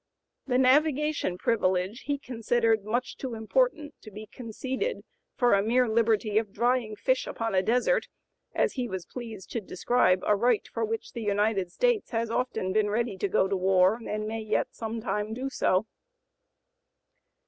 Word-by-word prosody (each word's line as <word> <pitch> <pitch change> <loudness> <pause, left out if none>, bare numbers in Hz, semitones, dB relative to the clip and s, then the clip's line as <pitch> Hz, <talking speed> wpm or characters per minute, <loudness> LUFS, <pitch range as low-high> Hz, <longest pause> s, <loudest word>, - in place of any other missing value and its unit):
The 250 -2 +2
navigation 290 - +2
privilege 190 +1 0
he 285 -1 0
considered 230 -4 0
"much 240 +5 -2
too 255 -4 -5
important 305 - 0
to 215 - -11
be 210 +1 -9
conceded 260 - -4 0.3
for 245 -4 +4
the 200 - +3
mere 245 +4 +2
liberty 220 -1 +2
of 215 -3 -6
drying 240 -1 0
fish 255 +5 0
upon 225 -2 -3
a 185 - +4
desert," 250 - +1 0.5
as - - +1
he 250 -3 -3
was 190 -3 -5
pleased 225 -6 -9
to 230 - -2
describe 185 -1 +1
a 210 - +4
right 235 +2 +1
for 230 - -3
which 225 0 -3
the 235 - -5
United 205 -3 0
States 485 - +1
has 230 -1 -2
often 225 -6 -1
been 215 0 +2
ready 225 0 -1
to 200 - 0
go 190 - +2
to 195 - -1
war 190 +3 +3
and 215 0 -3
may 225 +1 -3
yet 215 0 0
some 225 0 -5
time 215 -1 -2
do 265 +2 -4
so. 185 -3 +1
225 Hz, 170 wpm, -28 LUFS, 205-250 Hz, 0.5 s, for